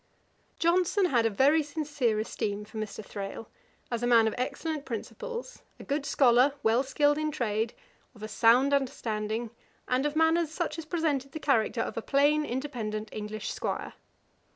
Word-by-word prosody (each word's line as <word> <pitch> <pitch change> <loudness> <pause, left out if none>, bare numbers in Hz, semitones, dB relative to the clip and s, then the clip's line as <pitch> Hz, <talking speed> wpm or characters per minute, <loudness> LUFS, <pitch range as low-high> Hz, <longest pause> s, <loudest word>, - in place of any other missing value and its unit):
] - - -40
Johnson 360 +3 +2
had 240 -9 +3
a - - +1
very 275 +9 +4
sincere 290 -6 -1
esteem 210 -1 -3
for 220 +1 -8
Mr. 215 0 -5
Thrale, 200 +3 -6 0.5
as 235 -1 -1
a 240 - 0
man 230 -2 +5
of 220 - -1
excellent 295 +4 -3
principles, 475 - -6 0.2
a - - -9
good 285 0 -2
scholar, 255 +1 +4
well 225 +3 +4
skilled 290 +2 +2
in 310 0 0
trade, 225 -4 -1 0.4
of 215 - -12
a - - -3
sound 240 +5 +4
understanding, 225 -4 -1 0.4
and 255 +1 +1
of 295 - -5
manners 320 0 +3
such 320 0 -3
as 325 - -6
presented 305 -5 -1
the 315 - -4
character 235 -5 +1
of - - -4
a - - -1
plain 290 +4 +3
independent 230 -5 -4
English 210 0 -5
'Squire. - - -3
260 Hz, 170 wpm, -29 LUFS, 220-300 Hz, 0.5 s, man